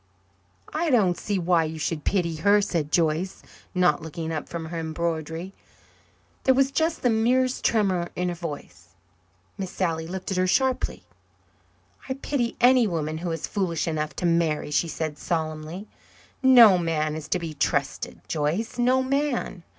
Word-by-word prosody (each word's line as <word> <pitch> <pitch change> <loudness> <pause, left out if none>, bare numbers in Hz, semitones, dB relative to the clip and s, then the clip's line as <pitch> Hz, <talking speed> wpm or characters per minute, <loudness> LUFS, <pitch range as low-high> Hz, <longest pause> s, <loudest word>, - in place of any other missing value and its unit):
"I 330 +1 0
don't 205 -9 +3
see 205 +2 -2
why 175 -2 +2
you 160 +1 -5
should 155 -1 -2
pity 170 -5 0
her," 200 +6 +4
said 165 -7 -1
Joyce, 165 +3 0 0.3
not 180 -4 +3
looking 160 +1 -5
up 155 -2 -4
from 170 -1 -5
her 165 +1 -5
embroidery. 160 +2 -3 0.9
There 260 - +4
was 270 +1 +3
just 320 +3 0
the 250 - +4
merest 250 +3 +1
tremor 190 -6 +1
in 180 0 -1
her - - -2
voice. 120 - -8 0.6
Miss 190 -2 -3
Sally 165 -4 -2
looked 185 +2 -5
at 190 - -1
her 185 0 +2
sharply. 260 +6 0 1.1
"I 260 - -1
pity 265 -3 -2
any 250 -1 +5
woman 160 -3 -2
who 175 +1 -3
is 165 -2 -3
foolish 175 -6 -2
enough 155 -3 -2
to - - -3
marry," 165 -3 +1
she 150 +4 +1
said 155 -2 -4
solemnly. 160 +3 -3 0.5
"No 240 -8 +8
man 155 -2 -1
is 155 -2 -6
to - - +1
be 165 -3 -5
trusted, 140 - -2
Joyce 165 +12 -2
no 255 +2 +3
man. 265 -8 -1
175 Hz, 160 wpm, -25 LUFS, 160-220 Hz, 1.1 s, No